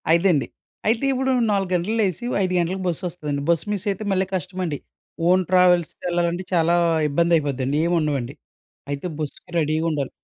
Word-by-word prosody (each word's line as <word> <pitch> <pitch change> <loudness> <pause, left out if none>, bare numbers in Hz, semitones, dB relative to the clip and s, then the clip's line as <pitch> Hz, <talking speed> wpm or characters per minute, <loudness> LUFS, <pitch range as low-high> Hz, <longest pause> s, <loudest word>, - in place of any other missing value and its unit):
ఐదండి. 170 -7 +2 0.4
అయితే 225 +4 +2
ఇప్పుడు 265 0 0 0.2
4 195 -2 0
గంటలకు 180 +6 0
లేసి 200 +3 -1 0.2
5 185 -1 -1
గంటలకు 185 +3 -1
బస్సొస్తదండి. 155 -4 -3
బస్ 170 -2 +3
మిస్సయితే 200 +1 -2
మళ్ళీ 190 0 +2
కష్టమండి. 180 -4 -3 0.5
ఓన్ 185 +1 +4
ట్రావెల్స్‌కెళ్ళాలంటే 175 0 +2
చాలా 170 0 +3 0.3
ఇబ్బందయిపోద్దండి 145 -4 +1
ఏమి 175 - +1
ఉండవండి. 140 -4 -1 0.6
అయితే 140 +5 -3
బస్సుకి 150 +3 -6
రెడీగుండాలి. 155 -2 0
175 Hz, 130 wpm, -23 LUFS, 155-185 Hz, 0.6 s, ఓన్